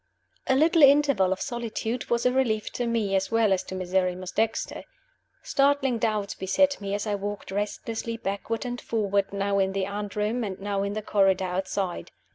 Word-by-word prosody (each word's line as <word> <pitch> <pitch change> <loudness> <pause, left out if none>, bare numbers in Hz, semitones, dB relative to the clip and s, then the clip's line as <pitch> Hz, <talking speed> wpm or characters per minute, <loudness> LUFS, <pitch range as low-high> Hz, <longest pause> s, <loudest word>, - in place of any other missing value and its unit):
A 265 - +3
LITTLE 320 +4 +4
interval 280 -9 +5
of 190 - -1
solitude 235 -1 -3
was 235 +1 +1
a 250 - +5
relief 235 -5 0
to 245 - -2
me, 220 -4 0
as 190 0 0
well 225 -3 +3
as 185 - 0
to 190 - -6
Miserrimus 185 0 -1
Dexter. 225 0 -1 0.6
Startling 275 -3 +2
doubts 210 -3 0
beset 275 +8 +1
me 200 0 -2
as 205 - -3
I 210 - -1
walked 205 0 -4
restlessly 220 +3 -3
backward 225 +3 -3
and 245 0 -4
forward, 200 -3 0
now 200 0 0
in 190 0 +1
the 195 -1 0
anteroom, 210 +3 -2
and 195 -3 -4
now 200 0 -2
in 200 0 -2
the 215 0 -4
corridor 195 -2 +2
outside. 185 0 -3
205 Hz, 180 wpm, -26 LUFS, 195-235 Hz, 0.6 s, interval